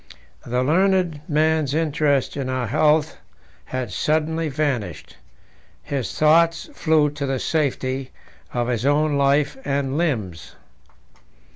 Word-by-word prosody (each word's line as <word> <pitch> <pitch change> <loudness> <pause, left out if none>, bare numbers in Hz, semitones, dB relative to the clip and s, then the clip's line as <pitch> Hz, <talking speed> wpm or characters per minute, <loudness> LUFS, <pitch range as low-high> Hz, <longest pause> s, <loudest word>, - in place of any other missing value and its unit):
The 125 +1 0
learned 180 0 +2
man's 155 -2 +1
interest 150 -4 +1
in 135 -2 -3
our 130 -1 -1
health 155 +6 +2 0.5
had 130 -5 -4
suddenly 155 - 0
vanished; 135 -6 -3 0.7
his 135 -4 -3
thoughts 165 - +3
flew 155 - +2
to 145 -1 -4
the 135 0 -1
safety 135 -3 -1 0.4
of 120 -1 -1
his 120 -2 -1
own 145 +2 +2
life 140 - +2
and 140 +1 -1
limbs. 105 - -3
145 Hz, 115 wpm, -22 LUFS, 130-155 Hz, 0.7 s, thoughts